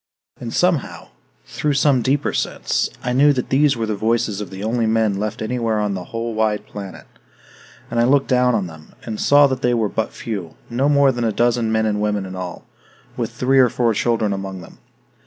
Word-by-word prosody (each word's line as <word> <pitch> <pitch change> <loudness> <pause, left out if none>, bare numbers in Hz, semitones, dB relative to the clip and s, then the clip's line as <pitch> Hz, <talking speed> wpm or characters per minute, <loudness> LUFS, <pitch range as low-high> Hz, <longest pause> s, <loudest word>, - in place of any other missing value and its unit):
And 120 -2 -6
somehow, 175 -2 0 0.4
through 145 - -2
some 135 -2 +3
deeper 140 +4 0
sense, - - -1
I 125 - -1
knew 145 +3 +5
that 125 -2 -3
these 140 0 +3
were 115 - -1
the 110 - -2
voices 110 -1 0
of 100 - -6
the 95 +1 -8
only 115 +1 0
men 110 -3 +1
left 105 +1 -3
anywhere 115 -1 -1
on 105 -1 -1
the 90 -2 -5
whole 115 +2 -4
wide 110 -1 0
planet. 100 -2 -9 0.9
And 115 - 0
I 120 - +4
looked 135 +2 +3
down 125 -2 +3
on 100 -4 0
them, 80 -2 -12
and 110 -2 -4
saw 145 0 +6
that 130 -2 -1
they 125 -1 +2
were 110 -3 0
but 110 - -2
few, 100 -8 -6 0.2
no 130 +4 +1
more 140 -2 +4
than 120 -2 -3
a 115 - +1
dozen 120 0 +1
men 110 0 +1
and 105 -1 0
women 105 -2 -1
in 95 0 -7
all, 90 -1 -7 0.5
with - - -3
three 135 +1 +2
or 125 -2 +6
four 115 0 +1
children 110 -1 0
among 95 -1 -5
them. 85 - -14
115 Hz, 210 wpm, -20 LUFS, 105-125 Hz, 0.9 s, saw